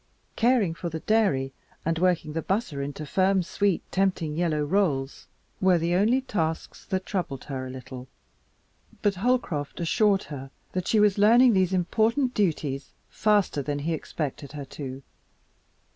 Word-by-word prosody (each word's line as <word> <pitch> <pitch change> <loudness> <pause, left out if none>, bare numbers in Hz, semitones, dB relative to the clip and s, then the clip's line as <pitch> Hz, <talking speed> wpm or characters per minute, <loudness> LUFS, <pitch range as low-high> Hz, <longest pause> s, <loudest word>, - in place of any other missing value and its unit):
Caring 235 -7 +3
for 170 +1 -5
the 160 -1 -5
dairy 145 -12 +1 0.3
and 165 0 0
working 175 -4 +1
the 165 - -1
butter 190 -6 -2
into 145 +2 -5
firm, 190 +4 +2
sweet, 195 +1 0
tempting 185 -5 0
yellow 160 -3 0
rolls 145 -6 0 0.3
were 185 -2 +5
the 170 +1 0
only 220 +8 +3
tasks 165 -10 -3
that 185 0 -2
troubled 170 -9 -3
her 130 -2 -5
a - - -8
little, 130 0 -9 1.0
but 205 - +3
Holcroft 190 - -1
assured 195 +4 +2
her 135 -3 -8 0.2
that 185 0 -3
she 220 - +3
was 210 -1 +4
learning 235 +4 +6
these 185 -2 +2
important 225 +8 +1
duties 150 -8 -1 0.2
faster 205 -8 +2
than 145 +1 -2
he 150 +4 -2
had 160 - 0
expected 145 -2 -5
her 145 -2 -6
to. 135 0 -7
175 Hz, 155 wpm, -26 LUFS, 145-205 Hz, 1.0 s, learning